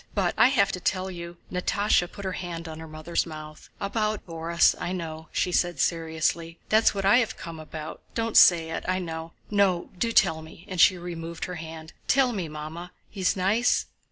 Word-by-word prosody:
—But - - +1
I - - +6
have 200 -8 +3
to 180 - -4
tell 185 +1 -1
you..." 170 -1 -8
Natásha 185 -1 +1
put 200 - -8
her 190 - -1
hand 170 -2 -5
on 160 0 -7
her 160 - -8
mother's 155 +3 -2
mouth. 155 -1 -10
"About 215 +1 -1
Borís... 165 0 +2
I 180 - -3
know," 160 -3 -5
she 180 - 0
said 175 0 +1
seriously; 165 0 0
"that's 220 0 +4
what 195 -1 -2
I 200 +5 +6
have 225 -3 0
come 165 +1 -8
about. 155 0 -8
Don't 230 -1 -1
say 165 -2 +7
it—I 185 +3 -1
know. 165 -2 -5 0.2
No, 195 -4 +2
do 230 - +1
tell 160 -7 +3
me!" 160 +3 -13
and 185 -4 0
she 185 - +6
removed 170 -1 -5
her 180 -1 -6
hand. 160 0 -9
"Tell 260 -2 +3
me, 185 -6 -3
Mamma! 155 +4 -7 0.2
He's 190 -3 0
nice?" 205 +6 +2
175 Hz, 190 wpm, -26 LUFS, 160-195 Hz, 0.2 s, say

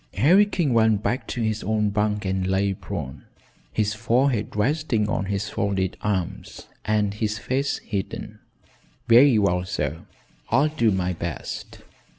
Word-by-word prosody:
Harry 175 - +5
King 165 -10 0
went 110 -2 +3
back 125 +2 -1
to 120 - -3
his 110 -1 -1
own 105 0 0
bunk 105 0 0
and 95 0 -1
lay 95 +1 +1
prone, - - -7 0.5
his 105 -1 0
forehead 115 +1 0
resting 120 -1 +1
on 100 -2 -1
his 100 +1 -2
folded 95 -2 -1
arms 95 -4 -3 0.2
and 105 -1 +1
his 105 0 -2
face 130 +7 -1
hidden. 100 -3 -5 0.7
"Very 120 +1 +7
well, 90 -3 +2
sir; 80 -5 -3 0.5
I'll 140 +6 +3
do 150 -7 +1
my 90 -2 0
best. 85 -1 -6
105 Hz, 145 wpm, -24 LUFS, 100-115 Hz, 0.7 s, Very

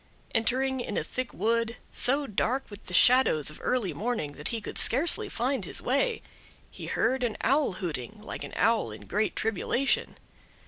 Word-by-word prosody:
Entering 260 +3 +1
in 245 - -3
a - - 0
thick 255 -1 -4
wood, 230 +1 0
so 280 +3 +2
dark 250 +3 -1
with 205 - -11
the 180 - -6
shadows 245 - +5
of 150 - -12
early 245 -7 0
morning 220 -10 -2
that 145 +1 -5
he 230 - -1
could 210 - -3
scarcely 340 - +3
find 250 -1 -1
his 165 - -2
way, 450 - 0 0.5
he - - -8
heard 265 0 +1
an 240 -3 -1
Owl 275 -3 +2
hooting, 175 - -5
like 210 - -7
an - - -8
owl 230 -1 +2
in - - -9
great 210 +1 -1
tribulation. 225 +5 0
235 Hz, 175 wpm, -28 LUFS, 210-265 Hz, 0.5 s, shadows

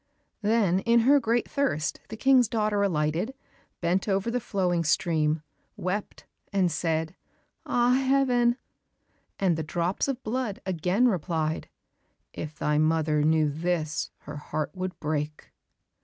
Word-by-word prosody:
Then 205 -4 +2
in 235 +3 +3
her 280 +5 +5
great 235 -1 0
thirst 265 - -1
the 220 - -7
King's 260 -1 +5
daughter 210 -2 0
alighted, 175 - 0 0.5
bent 180 +4 +1
over 195 +3 0
the 250 - 0
flowing 180 -6 0
stream, 155 -1 +1 0.3
wept 190 +3 -4 0.3
and 185 -3 +2
said, 160 +1 -1 0.5
"Ah, 245 +1 +3
Heaven!" 250 -3 +3 0.8
and 180 -4 +2
the - - -1
drops 170 - -1
of 270 -2 -3
blood 225 -2 -2
again 185 +6 +2
replied, 160 -6 -1 0.6
"If 155 0 -6
thy 150 0 +1
mother 155 -1 +2
knew 155 0 +3
this, 155 0 -1
her 150 0 -8
heart 150 +1 -3
would 185 -1 -5
break." 150 0 -3
180 Hz, 130 wpm, -27 LUFS, 155-230 Hz, 0.8 s, her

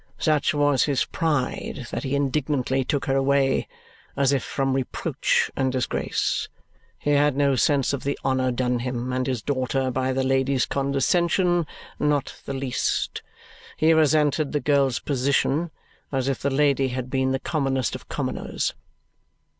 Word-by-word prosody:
Such 155 -2 +2
was 145 -2 +3
his 140 -3 +1
pride, 145 -3 -2
that - - -3
he 140 -1 -2
indignantly 135 -1 0
took 140 +1 -1
her 135 - +1
away, 135 0 +2 0.5
as 140 0 +3
if 135 - +1
from 135 -1 -1
reproach 130 -1 0
and 130 -1 +1
disgrace. 130 -1 -1 0.5
He 145 - -1
had 145 -1 +3
no 140 -1 +3
sense 140 +1 +2
of 140 - -3
the 140 0 -1
honour 130 -1 +1
done 125 0 0
him 125 0 -3
and 130 0 -1
his 125 -5 -2
daughter 130 -1 -1
by 130 +1 0
the 130 0 0
lady's 135 0 +2
condescension; 170 +5 +1 0.3
not 145 -2 0
the 140 - -3
least. 135 -2 -1 0.6
He 160 +1 +4
resented 155 -1 +2
the 150 - +1
girl's 140 -3 +2
position, 140 +4 0 0.4
as 135 -2 -1
if 135 - -1
the 140 - 0
lady 140 -1 +2
had 130 0 -4
been 130 -1 +1
the 135 - +1
commonest 135 -4 -1
of - - -8
commoners. - - -2
135 Hz, 155 wpm, -24 LUFS, 130-145 Hz, 0.6 s, He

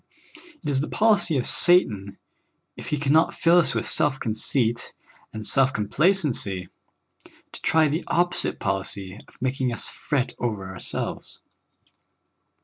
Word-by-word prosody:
It - - -6
is 135 -2 +1
the 150 - -3
polic}' 205 -8 +3
of 125 - -1
Satan, 105 - +3 0.6
if - - -10
he 150 - -1
can 145 0 0
not 160 +1 +3
fill 170 +1 +4
us 170 - +3
with - - -2
self 145 -4 +2
conceit 115 +1 -2 0.4
and 110 -1 -7
self 130 +3 +3
complacenc}^ 110 - 0 0.8
to - - -9
tr}^ 160 -2 +2
the 160 +4 -2
opposite 175 +1 +1
polic}^ 95 0 -3
of - - -22
making 130 0 -1
us 120 - -4
fret 135 -4 -2
over 105 -6 -3
ourselves. 95 -1 -2
130 Hz, 140 wpm, -24 LUFS, 105-160 Hz, 0.8 s, fill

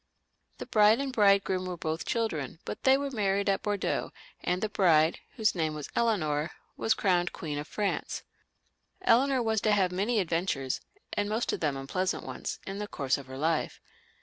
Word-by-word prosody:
The - - -6
bride 215 +1 +5
and 275 -1 -2
bridegroom 195 -4 +3
were 180 -1 -4
both 160 0 -3
children, 165 - -1
but - - -6
they 265 0 +7
were 280 0 -3
married 200 -4 0
at 195 -1 +2
Bordeaux, 205 -2 -1 0.3
and 180 +1 0
the 215 - 0
bride, 165 -6 +3 0.2
whose 220 -3 +2
name 160 -3 -1
was 150 -2 -7
Eleanor, 160 -10 +1 0.3
was 220 - +1
crowned 180 -3 +1
Queen 150 -2 -4
of 150 - -6
Franca 205 -2 -2 0.8
Eleanor 260 -2 +4
was 220 -2 +1
to 215 - +2
have 190 -3 +3
many 210 +5 +1
adventures, 165 -7 -1 0.3
and 205 0 0
most 220 +3 0
of - - -2
them 145 -4 0
unpleasant 185 +8 -2
ones, - - -5
in 195 +1 -5
the 210 - -3
course 140 -7 -1
of 135 - -11
her 130 0 -8
life. 160 +2 0
195 Hz, 180 wpm, -29 LUFS, 160-215 Hz, 0.8 s, they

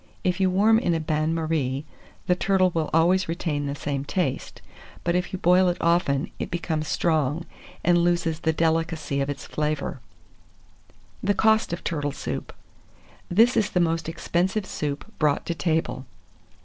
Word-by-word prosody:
If 180 +1 0
you 190 -1 +3
warm 210 +4 +4
in 175 -8 +1
a - - 0
bain 155 0 0
marie, 155 -4 -1 0.4
the 180 - +3
turtle 185 0 +2
will 160 -2 -1
always 175 +3 +3
retain 155 -4 -2
the 140 - -3
same 140 -1 -3
taste; 145 -2 -2 0.4
but 170 - +1
if 180 0 -1
you 190 - -3
boil 180 +1 +4
it 175 - 0
often, 170 -3 +1
it - - -3
becomes 160 -3 -2
strong, 155 0 0 0.4
and 175 0 +4
loses 170 -2 +1
the 160 0 +1
delicacy 160 -3 0
of 135 - -1
its 145 - -5
flavour. 150 -2 -2 1.2
THE 205 +1 +1
COST 220 -1 +3
OF 170 - -4
TURTLE 145 -3 -2
SOUP. - - -5 0.8
This 230 +7 +4
is 210 - +2
the 180 - 0
most 165 -2 0
expensive 185 +5 -1
soup 145 -5 -4
brought 150 -2 +2
to 170 - -1
table. 160 -6 -1
165 Hz, 160 wpm, -25 LUFS, 150-180 Hz, 1.2 s, warm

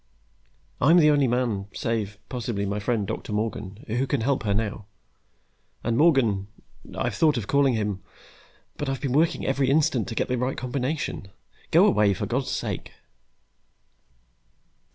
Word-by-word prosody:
I'm 160 +7 +6
the 150 -3 +6
only 145 -2 +3
man, 120 -5 -1
save, 110 -3 -2
possibly, 115 -5 -3
my 100 +1 -2
friend 105 -1 0
Doctor 110 +1 -5
Morgan, 105 -1 -3
who 120 +4 -1
can 140 -4 0
help 135 +3 +1
her 105 -3 0
now. 105 -1 -3 1.0
And 115 0 0
Morgan 120 - +3 0.5
I've - - -1
thought 155 -5 +3
of 115 - -3
calling 140 0 +3
him, 105 -3 -2 0.8
but 145 - -3
I've 135 - -2
been 135 -3 -2
working 160 +4 +2
every 135 -1 +1
instant 140 -6 +2
to 115 - -5
get - - 0
the 125 -1 -1
right 125 +2 -1
combination. 130 -2 -3 0.4
Go - - +6
away, 105 -2 +3
for - - -3
God's 125 +3 -2
sake!" - - -4
120 Hz, 155 wpm, -25 LUFS, 105-135 Hz, 1.0 s, I'm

